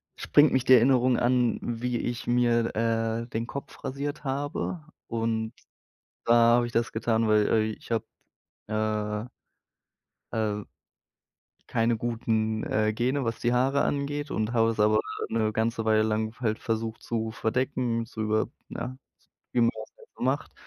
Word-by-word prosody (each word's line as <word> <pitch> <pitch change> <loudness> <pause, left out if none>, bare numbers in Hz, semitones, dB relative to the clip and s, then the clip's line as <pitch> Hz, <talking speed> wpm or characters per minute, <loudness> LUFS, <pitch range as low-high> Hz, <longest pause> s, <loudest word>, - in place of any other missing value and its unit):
springt 145 +1 +4
mich 130 -2 +2
die 130 - +7
Erinnerung 125 0 +5
an, 120 -2 +2
wie 120 +1 -2
ich 120 0 -4
mir, 120 -1 +2
äh, 115 0 0
den 115 0 -3
Kopf 140 +1 -8
rasiert 145 +3 -4
habe. 145 +4 -3 0.2
Und 115 0 -1 0.7
da 115 - +5 0.2
habe 120 - +2
ich 120 - -8
das 115 0 0
getan, 115 0 +1
weil, 105 -1 +4
äh, 110 - +3
ich - - -13
habe, 115 -1 0 0.6
äh 110 +1 -2 1.0
äh 105 -2 -1 1.0
keine 115 0 +1
guten, 110 -1 -1
äh, 110 0 +1
Gene, 125 +4 0
was 115 0 -2
die 120 - +2
Haare 135 +3 +2
angeht, 145 +1 -2
und 110 +2 -1
habe 115 -1 +3
es 115 - -3
aber 110 +1 +4 0.3
'ne 110 -1 +1
ganze 115 +1 0
Weile 110 0 +3
lang 110 0 -1
halt 110 -3 -1
versucht, 115 0 -3
zu 110 -1 -2
verdecken, 120 0 -1
zu 110 -1 -7
über 110 0 +1 0.2
ja, 125 +2 -5 0.6
wie 125 - +2
man 115 - +5
das 110 0 -10
halt - - -18
so - - -10
macht. 130 +4 0
115 Hz, 155 wpm, -27 LUFS, 110-125 Hz, 1.0 s, die